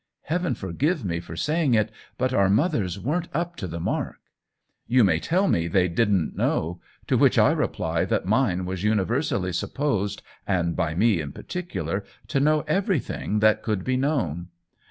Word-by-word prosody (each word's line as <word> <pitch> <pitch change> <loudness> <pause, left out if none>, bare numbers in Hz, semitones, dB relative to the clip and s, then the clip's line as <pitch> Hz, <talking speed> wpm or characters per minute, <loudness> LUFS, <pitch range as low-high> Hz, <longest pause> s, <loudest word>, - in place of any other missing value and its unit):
Heaven 175 +3 -1
forgive 135 - -1
me 85 -2 -1
for 85 -1 -9
saying 150 - +1
it, 110 0 +1 0.3
but 130 0 0
our 100 -5 +3
mothers 105 - +1
weren't 160 - -1
up 175 +2 -1
to 95 - -4
the 85 0 -5
mark! - - -2 0.7
You 125 0 +5
may 90 -5 +3
tell 185 - +1
me 85 - +1
they 90 +1 +2
didn't 95 -2 +1
know; 85 +2 -1 0.2
to - - +2
which - - +4
I - - +6
reply - - -1
that - - 0
mine 90 +1 +1
was 90 -1 -4
universally 105 - 0
supposed, 105 - -1 0.2
and 85 -4 0
by 80 0 -1
me 100 -2 +3
in 70 -2 -6
particular, 180 - -4 0.3
to 135 - +1
know 150 +2 +3
everything 155 - -1
that 110 0 +4
could 105 -5 -2
be 130 +3 0
known. 125 - -1
105 Hz, 170 wpm, -25 LUFS, 90-150 Hz, 0.7 s, I